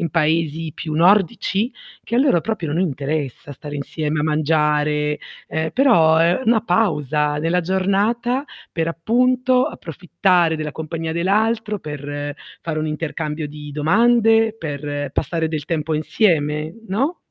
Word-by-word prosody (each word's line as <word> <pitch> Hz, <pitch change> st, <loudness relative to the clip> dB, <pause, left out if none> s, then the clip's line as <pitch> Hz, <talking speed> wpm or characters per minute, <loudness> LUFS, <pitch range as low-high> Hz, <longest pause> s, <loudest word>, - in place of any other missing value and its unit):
in 165 Hz, -, -1 dB
paesi 160 Hz, -1 st, 0 dB
più 155 Hz, -1 st, -5 dB
nordici, 195 Hz, +5 st, +2 dB, 0.3 s
che -, -, -5 dB
a -, -, +4 dB
loro 265 Hz, -, +4 dB
proprio 170 Hz, -5 st, -3 dB
non 170 Hz, -, 0 dB
interessa 145 Hz, -3 st, -3 dB
stare 145 Hz, +2 st, -7 dB
insieme 150 Hz, +2 st, -2 dB
a -, -, 0 dB
mangiare, 150 Hz, -1 st, +1 dB, 0.3 s
ehm, 160 Hz, +1 st, -2 dB
però 170 Hz, -, +4 dB
è 170 Hz, +6 st, +3 dB
una 225 Hz, -1 st, +4 dB
pausa 150 Hz, -, +1 dB
nella 165 Hz, +3 st, +1 dB
giornata 205 Hz, -, 0 dB, 0.3 s
per 165 Hz, 0 st, -1 dB
appunto 250 Hz, +8 st, +2 dB
approfittare 175 Hz, 0 st, 0 dB
della 155 Hz, -1 st, -4 dB
compagnia 160 Hz, +1 st, -4 dB
dell'altro, 210 Hz, +4 st, 0 dB
per 145 Hz, -1 st, -5 dB, 0.3 s
fare 160 Hz, -2 st, -3 dB
un 155 Hz, -, -1 dB
intercambio 155 Hz, 0 st, -3 dB
di 150 Hz, 0 st, -9 dB
domande, 225 Hz, +7 st, +3 dB
per 145 Hz, -4 st, -4 dB
passare 165 Hz, -2 st, -1 dB
del 155 Hz, -2 st, -3 dB
tempo 155 Hz, -1 st, -2 dB
insieme, 155 Hz, -2 st, +1 dB
no? 270 Hz, -, 0 dB
160 Hz, 135 wpm, -20 LUFS, 150-200 Hz, 0.3 s, a